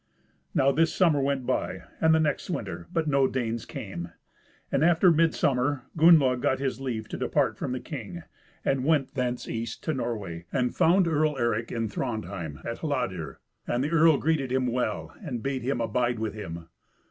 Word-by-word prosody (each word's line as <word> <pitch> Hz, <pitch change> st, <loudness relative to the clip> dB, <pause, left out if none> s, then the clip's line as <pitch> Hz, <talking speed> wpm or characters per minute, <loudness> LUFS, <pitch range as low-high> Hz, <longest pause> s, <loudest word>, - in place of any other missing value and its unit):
Now 135 Hz, +1 st, +4 dB
this 165 Hz, +4 st, +2 dB
summer 160 Hz, -6 st, +3 dB
went 135 Hz, -2 st, 0 dB
by, -, -, -2 dB, 0.2 s
and 160 Hz, 0 st, +5 dB
the -, -, +3 dB
next 150 Hz, +1 st, 0 dB
winter, 175 Hz, -, -4 dB
but 165 Hz, -2 st, 0 dB
no 140 Hz, -2 st, +3 dB
Danes 115 Hz, -3 st, -2 dB
came; 85 Hz, -4 st, -6 dB, 0.6 s
and 140 Hz, -, +2 dB
after 175 Hz, +2 st, +5 dB
midsummer 145 Hz, -4 st, +2 dB
Gunnlaug 155 Hz, -6 st, +6 dB
got 130 Hz, -, +2 dB
his 135 Hz, -1 st, -3 dB
leave 115 Hz, -5 st, -3 dB
to -, -, -4 dB
depart -, -, +1 dB
from -, -, -4 dB
the 130 Hz, -, -2 dB
king, 150 Hz, +5 st, -7 dB, 0.4 s
and 135 Hz, -1 st, +1 dB
went 150 Hz, -2 st, +2 dB
thence 125 Hz, -2 st, -2 dB
east 115 Hz, 0 st, -4 dB
to 160 Hz, -, -1 dB
Norway, 105 Hz, -, -4 dB
and 125 Hz, -2 st, 0 dB
found 180 Hz, +2 st, +4 dB
Earl 155 Hz, -2 st, +1 dB
Eric 115 Hz, -2 st, 0 dB
in 115 Hz, -1 st, -1 dB
Thrandheim, 100 Hz, -, -4 dB
at -, -, -4 dB
Hladir, -, -, -3 dB, 0.3 s
and 120 Hz, +2 st, 0 dB
the 150 Hz, -, -2 dB
earl 165 Hz, -2 st, +5 dB
greeted 145 Hz, -4 st, 0 dB
him 130 Hz, 0 st, +1 dB
well, 105 Hz, -11 st, -2 dB
and 125 Hz, -7 st, -5 dB
bade 135 Hz, -1 st, -2 dB
him 125 Hz, +1 st, -1 dB
abide 120 Hz, +2 st, 0 dB
with 110 Hz, -1 st, -3 dB
him. 85 Hz, -6 st, -7 dB
130 Hz, 180 wpm, -27 LUFS, 115-150 Hz, 0.6 s, Gunnlaug